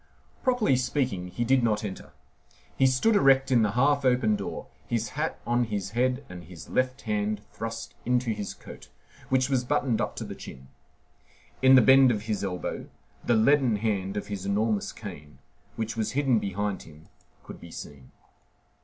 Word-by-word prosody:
Properly 245 - +2
speaking, 125 -8 -1
he 120 +6 -3
did 130 +2 +3
not 110 -3 +1
enter. 100 -3 -7 0.6
He 135 - +4
stood 130 - +2
erect 135 -6 +4
in 120 -3 +5
the 105 -2 +1
half 140 +3 +3
open 125 -4 +3
door, 100 -1 -5 0.2
his 115 -2 -1
hat 155 +3 -3
on 120 0 +1
his 100 -3 -4
head 125 +4 0
and 90 -1 -9
his 85 -1 -11
left 130 +1 0
hand 105 -1 -1
thrust 115 0 -6
into 125 -1 +1
his 105 -2 -4
coat, - - -12 0.4
which 130 -1 +2
was 130 -3 +1
buttoned 130 -3 0
up - - -2
to - - -5
the - - -6
chin. 65 0 -11 0.9
In 130 0 +7
the 130 - +7
bend 135 +2 +7
of 105 -3 -1
his 110 -2 -2
elbow 90 -2 -4 0.3
the 120 - +2
leaden 125 +1 +4
head 100 -2 -2
of 105 - -3
his 100 -2 -5
enormous 105 +1 0
cane, 75 0 -10 0.4
which 110 0 -3
was 110 +1 -2
hidden 135 -4 +2
behind 100 0 -3
him, 75 0 -15 0.4
could - - -10
be 85 - -11
seen. 70 -5 -10
115 Hz, 175 wpm, -27 LUFS, 100-130 Hz, 0.9 s, In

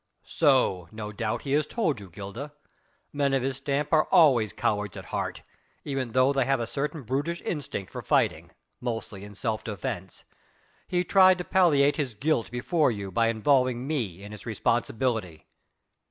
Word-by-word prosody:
"So, 130 - +2
no 105 -1 -6
doubt, 110 +1 -3
he 140 - -4
has 150 +1 +2
told 160 - -1
you, 100 -2 -11
Gilda. 100 - -8 0.6
Men 140 -1 +1
of 130 - 0
his 135 0 -2
stamp 140 +2 -2
are 155 -1 +5
always 125 - +5
cowards 105 -4 -1
at - - -8
heart, - - -4 0.4
even 135 -5 -3
though 130 +2 +4
they 135 -1 +2
have 135 +1 +1
a 115 - -1
certain 150 +4 -3
brutish 145 +8 -2
instinct 140 - -4
for - - -6
fighting - - +1 0.3
mostly 115 -5 -5
in 105 0 -11
self 110 0 -2
defence. 95 -3 -5 0.6
He 180 0 +1
tried 185 0 +6
to 180 - -4
palliate 145 -7 +3
his 130 -7 -2
guilt 140 0 0
before 145 +5 +1
you 100 -4 -4
by 115 +4 +2
involving 125 +2 +2
me 110 - -3
in 105 +1 -9
its 105 +2 -10
responsibility." 110 - -1
130 Hz, 170 wpm, -27 LUFS, 110-145 Hz, 0.6 s, tried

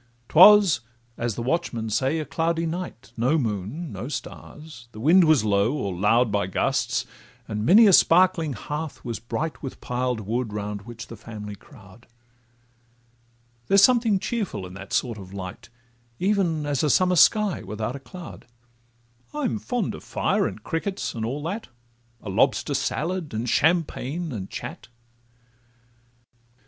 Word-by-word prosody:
'Twas, 195 -1 +7 0.4
as 120 -3 -2
the 120 - -4
watchmen 120 -5 -1
say, 130 +8 0
a 155 - -3
cloudy 165 +3 -1
night; 160 - -6
No 125 +7 +2
moon, 115 - -3
no 100 +4 -6
stars, 145 -2 -8
the 110 - -10
wind 170 +9 +5
was 155 -8 +4
low 100 +4 +2
or 100 -10 -3
loud 105 +6 +2
By 100 -3 0
gusts, 95 - 0 0.4
and 105 0 -3
many 220 +5 +8
a 200 - +6
sparkling 170 -4 +4
hearth 150 +7 -6
was 115 -2 -4
bright 140 +5 -4
With 135 - -5
the - - -21
piled 125 -2 -1
wood, 110 +2 -3
round 105 0 -5
which 115 -1 -8
the 115 - -10
family 105 -1 -8
crowd; 110 -1 -17 1.6
There's 195 0 +5
something 230 -5 +4
cheerful 200 - -3
in 90 - -10
that 100 0 -10
sort 115 -4 -1
of 95 0 -11
light, 95 +2 -8 0.5
Even 180 -6 0
as 145 -3 0
a 150 - +1
summer 180 +5 +3
sky 205 +5 +4
's - - -12
without 110 +5 -4
a - - -6
cloud: 175 -1 -11 0.9
I'm 270 -7 -1
fond 245 +3 -2
of - - -10
fire, - - 0
and - - -8
crickets, 190 +4 -3
and 115 - -4
all 135 +6 -3
that, 200 +8 -4 0.6
A 105 - -6
lobster - - +2
salad, 165 -1 -2
and 115 +3 -2
champagne, 160 +1 0
and 100 -6 -6
chat. - - -7
135 Hz, 155 wpm, -24 LUFS, 110-170 Hz, 1.6 s, many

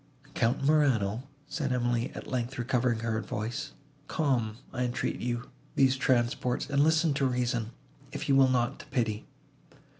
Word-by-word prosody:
"Count 120 +4 +1
Morano," 130 -6 +2 0.2
said 140 -4 -2
Emily, 120 -1 0
at - - -7
length 125 +1 -3
recovering 120 -1 +1
her 110 -1 -1
voice, 115 +8 -4 0.3
"calm, 120 -8 0 0.2
I 125 - -2
entreat 125 0 -1
you, 120 +1 -3 0.2
these 135 -1 +4
transports, 125 -1 +1
and 140 0 +3
listen 160 0 +3
to 140 0 +1
reason, 120 -3 0 0.4
if - - -5
you 135 - +4
will 135 -1 +6
not 120 -2 +1
to - - -11
pity. 115 -5 -1
125 Hz, 150 wpm, -29 LUFS, 120-135 Hz, 0.4 s, will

